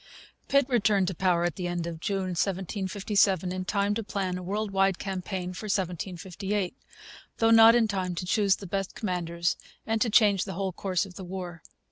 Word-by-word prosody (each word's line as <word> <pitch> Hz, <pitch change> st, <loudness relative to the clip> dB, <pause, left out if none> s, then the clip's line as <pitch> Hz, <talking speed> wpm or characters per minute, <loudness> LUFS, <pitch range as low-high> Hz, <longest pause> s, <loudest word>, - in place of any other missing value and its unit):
Pitt 280 Hz, -2 st, +3 dB
returned 205 Hz, -6 st, +2 dB
to -, -, -3 dB
power 175 Hz, -1 st, +1 dB
at 175 Hz, -3 st, -1 dB
the 180 Hz, -, -2 dB
end 175 Hz, -1 st, -2 dB
of 170 Hz, -1 st, -5 dB
June 190 Hz, +1 st, -2 dB
1757, 195 Hz, +1 st, 0 dB
in 185 Hz, 0 st, -3 dB
time 200 Hz, +1 st, +1 dB
to 225 Hz, -, -2 dB
plan 195 Hz, -3 st, -2 dB
a 180 Hz, -, -5 dB
world 205 Hz, +3 st, -2 dB
wide 195 Hz, -1 st, +2 dB
campaign 185 Hz, -1 st, -4 dB
for 200 Hz, -, -7 dB
1758, 190 Hz, +1 st, -2 dB, 0.6 s
though 225 Hz, 0 st, +3 dB
not 225 Hz, 0 st, +8 dB
in 235 Hz, -2 st, +4 dB
time 185 Hz, -3 st, -2 dB
to 180 Hz, -, -4 dB
choose 200 Hz, +1 st, +3 dB
the 200 Hz, -, -10 dB
best 195 Hz, +1 st, -3 dB
commanders 175 Hz, -4 st, -1 dB, 0.3 s
and 225 Hz, 0 st, -1 dB
to 235 Hz, -, +3 dB
change 205 Hz, -3 st, +4 dB
the 190 Hz, -, -6 dB
whole 190 Hz, +1 st, -2 dB
course 185 Hz, +1 st, -1 dB
of 185 Hz, -2 st, -12 dB
the 190 Hz, -, -7 dB
war. 180 Hz, -2 st, -6 dB
190 Hz, 190 wpm, -27 LUFS, 180-205 Hz, 0.6 s, not